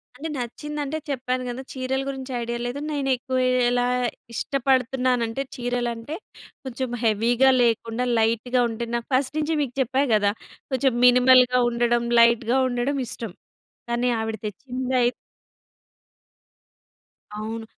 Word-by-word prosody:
అంటే 305 Hz, +5 st, -6 dB
నచ్చిందంటే 295 Hz, +4 st, -4 dB
చెప్పాను 255 Hz, -1 st, -2 dB
గదా! 245 Hz, +2 st, -5 dB
చీరల 265 Hz, 0 st, -2 dB
గురించి 265 Hz, -1 st, -5 dB
ఐడియా 235 Hz, 0 st, -3 dB
లేదు 245 Hz, +3 st, -3 dB
నేనేక్కువ 265 Hz, -2 st, -1 dB, 0.3 s
ఎలా 245 Hz, 0 st, +1 dB, 0.5 s
ఇష్టపడుతున్నానంటే 255 Hz, -2 st, 0 dB
చీరలంటే 245 Hz, +2 st, -3 dB, 0.5 s
కొంచెం 260 Hz, -1 st, -4 dB
హెవీగా 230 Hz, +4 st, +3 dB
లేకుండా 230 Hz, +1 st, +1 dB
లైట్‌గా 230 Hz, +3 st, +1 dB
ఉంటే 230 Hz, +1 st, -4 dB
నాకు 235 Hz, -, -3 dB
ఫస్ట్ 260 Hz, +2 st, +1 dB
నుంచి 310 Hz, +1 st, 0 dB
మీకు 255 Hz, -4 st, -2 dB
చెప్పా 260 Hz, +3 st, +1 dB
గదా! 205 Hz, -1 st, +3 dB, 0.4 s
కొంచెం 265 Hz, 0 st, +2 dB
మినిమల్‌గా 250 Hz, 0 st, +6 dB
ఉండడం, 240 Hz, 0 st, +1 dB, 0.2 s
లైట్‌గా 235 Hz, +1 st, +4 dB
ఉండడం 250 Hz, +3 st, -1 dB
ఇష్టం. 225 Hz, -3 st, -6 dB, 0.6 s
కానీ 240 Hz, +1 st, +1 dB
ఆవిడ 220 Hz, 0 st, -2 dB
తెచ్చిందై 255 Hz, +4 st, -1 dB, 2.3 s
అవును. 225 Hz, +1 st, -5 dB
250 Hz, 110 wpm, -24 LUFS, 235-265 Hz, 2.3 s, మినిమల్‌గా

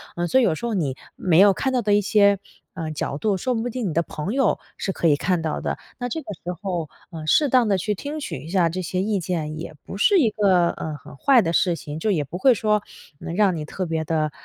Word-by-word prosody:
呃， 175 Hz, 0 st, -1 dB
所 260 Hz, -, +4 dB
以 -, -, +3 dB
有 180 Hz, -, +3 dB
时 235 Hz, -, -5 dB
候 230 Hz, -, -2 dB
你 140 Hz, -8 st, -1 dB, 0.2 s
没 175 Hz, -3 st, +3 dB
有 200 Hz, 0 st, +7 dB
看 265 Hz, +7 st, -1 dB
到 250 Hz, -, +2 dB
的 205 Hz, -1 st, +1 dB
一 205 Hz, -, +4 dB
些， 200 Hz, -1 st, +4 dB, 0.3 s
呃， 165 Hz, -3 st, -4 dB
角 145 Hz, -2 st, -3 dB
度， 200 Hz, +2 st, 0 dB
说 255 Hz, +7 st, -1 dB
不 230 Hz, +2 st, -2 dB
定 235 Hz, -4 st, -3 dB
你 160 Hz, -, -3 dB
的 170 Hz, -, +2 dB
朋 165 Hz, +7 st, -5 dB
友 270 Hz, -5 st, +2 dB, 0.2 s
是 195 Hz, -, -2 dB
可 170 Hz, -, 0 dB
以 150 Hz, -, +5 dB
看 180 Hz, +3 st, 0 dB
到 160 Hz, -1 st, -2 dB
的。 -, -, -2 dB, 0.2 s
那 245 Hz, 0 st, -3 dB
这 320 Hz, -, -3 dB
个 210 Hz, -, -7 dB
时 180 Hz, -, -3 dB
候， 175 Hz, -6 st, -3 dB, 0.2 s
呃， 160 Hz, -2 st, -7 dB
适 295 Hz, -, +4 dB
当 250 Hz, -1 st, +4 dB
的 195 Hz, -, +2 dB
去 210 Hz, +3 st, -1 dB
听 290 Hz, +8 st, -5 dB
取 280 Hz, -, -5 dB
一 160 Hz, -, -9 dB
下 180 Hz, -2 st, +3 dB
这 185 Hz, +3 st, -3 dB
些 185 Hz, +1 st, -2 dB
意 205 Hz, 0 st, 0 dB
见， 155 Hz, -3 st, -3 dB
也 160 Hz, -, -7 dB
不 -, -, -7 dB
是 390 Hz, -, +4 dB
一 240 Hz, -, +4 dB
个， 185 Hz, -5 st, +3 dB
呃， 155 Hz, -1 st, -5 dB
很 -, -, -13 dB
坏 265 Hz, -, +5 dB
的 165 Hz, -4 st, -1 dB
事 175 Hz, 0 st, +2 dB
情。 150 Hz, -1 st, -7 dB
就 215 Hz, +4 st, +1 dB
也 155 Hz, -6 st, +1 dB
不 160 Hz, +6 st, -6 dB
会 260 Hz, +6 st, +5 dB
说， 210 Hz, -1 st, +1 dB, 0.4 s
嗯 165 Hz, -, -5 dB
让 195 Hz, -4 st, +3 dB
你 155 Hz, -, -4 dB
特 185 Hz, +4 st, -4 dB
别 160 Hz, -1 st, -2 dB
的， 155 Hz, -2 st, 0 dB
185 Hz, 290 characters per minute, -23 LUFS, 165-215 Hz, 0.4 s, 有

